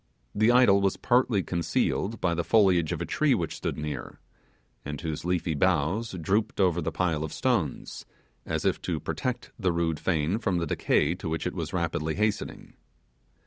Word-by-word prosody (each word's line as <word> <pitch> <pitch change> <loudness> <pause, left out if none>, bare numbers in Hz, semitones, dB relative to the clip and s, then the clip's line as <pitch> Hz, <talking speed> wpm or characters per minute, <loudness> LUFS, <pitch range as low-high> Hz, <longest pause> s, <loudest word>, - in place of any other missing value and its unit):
The 110 +3 +4
idol 120 -6 +5
was 95 -1 +1
partly 120 -5 +2
concealed 95 +4 -1
by 90 -2 +1
the 85 0 -1
foliage 95 -7 +3
of - - -2
a - - -4
tree - - +2
which - - -3
stood - - -3
near, 75 -4 -5 0.6
and 75 0 -5
whose 80 0 -4
leafy 90 -2 0
boughs 90 +7 +1
drooped 100 +7 0
over 90 -3 +3
the - - -2
pile 80 -4 0
of 80 - -4
stones, 115 - -2 0.4
as - - -3
if - - +1
to - - -2
protect 125 -2 -3
the 95 -4 +1
rude 85 -2 -1
fane 85 +4 0
from 95 -6 0
the 85 - 0
decay 75 0 +1
to 90 -2 -6
which 80 0 -2
it 90 - -2
was 85 -4 -4
rapidly 80 -3 -1
hastening. 105 0 -2
90 Hz, 180 wpm, -27 LUFS, 80-100 Hz, 0.6 s, idol